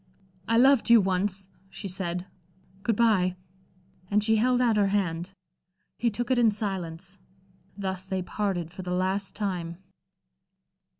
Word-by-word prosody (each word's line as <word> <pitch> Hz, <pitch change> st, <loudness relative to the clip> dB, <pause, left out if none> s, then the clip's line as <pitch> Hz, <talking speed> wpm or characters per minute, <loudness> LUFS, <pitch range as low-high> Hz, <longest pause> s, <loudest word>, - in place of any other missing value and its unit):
"I 230 Hz, -, +3 dB
loved 265 Hz, 0 st, +5 dB
you 235 Hz, -1 st, +8 dB
once," 190 Hz, 0 st, -1 dB, 0.2 s
she 195 Hz, -, -7 dB
said. 180 Hz, -1 st, -3 dB, 0.6 s
"Good 225 Hz, +2 st, +1 dB
bye." 200 Hz, -5 st, +3 dB, 0.7 s
And 210 Hz, 0 st, +2 dB
she 220 Hz, 0 st, +3 dB
held 250 Hz, +3 st, +3 dB
out 240 Hz, -3 st, +3 dB
her 205 Hz, -1 st, +3 dB
hand. 190 Hz, -2 st, -1 dB, 0.6 s
He 235 Hz, -, +1 dB
took 240 Hz, +4 st, -3 dB
it 255 Hz, -, +3 dB
in 235 Hz, -2 st, +5 dB
silence. 190 Hz, -3 st, -5 dB, 0.6 s
Thus 190 Hz, -1 st, -4 dB
they 190 Hz, -1 st, -2 dB
parted 180 Hz, -4 st, -2 dB
for 185 Hz, -, -8 dB
the 180 Hz, -, -6 dB
last 190 Hz, +2 st, -1 dB
time. 180 Hz, -5 st, -3 dB
195 Hz, 140 wpm, -27 LUFS, 185-220 Hz, 0.7 s, you